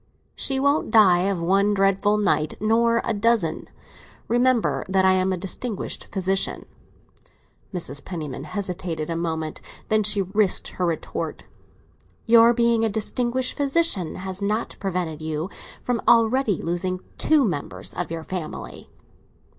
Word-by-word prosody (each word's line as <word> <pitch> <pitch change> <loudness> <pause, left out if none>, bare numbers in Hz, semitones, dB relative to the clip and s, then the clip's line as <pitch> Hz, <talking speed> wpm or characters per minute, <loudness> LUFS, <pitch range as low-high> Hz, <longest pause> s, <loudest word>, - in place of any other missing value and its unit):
"She 270 -1 +1
won't 280 +3 +1
die 195 -4 +5
of 180 -4 -2
one 200 +4 +2
dreadful 195 +1 +2
night, 155 -7 +1
nor 230 +2 +2
of - - -1
a - - 0
dozen. 205 -6 0 0.6
Remember 235 - +2
that 190 0 +3
I 190 - +6
am 185 0 +1
a 185 - -1
distinguished 195 +4 -4
physician." 190 -1 -1 1.1
Mrs. 145 -7 -4
Penniman 150 -6 -6
hesitated 175 -3 -4
a - - -2
moment. 160 -2 -3 0.3
Then 215 0 +3
she 205 -1 +2
risked 195 +1 +1
her 180 - -2
retort. 165 -2 -4 0.8
"Your 230 0 +7
being 235 -1 +2
a 225 - +2
distinguished 240 +4 -1
physician 280 - +1
has 190 +1 -6
not 210 +3 -2
prevented 175 -5 -3
you 155 +4 -3 0.3
from 245 -2 -1
already 230 -3 +4
losing 180 +2 -2 0.2
two 305 -4 +4
members 150 -9 -4
of - - -4
your 165 -1 -5
family!" 175 -2 -7
195 Hz, 140 wpm, -23 LUFS, 175-230 Hz, 1.1 s, Your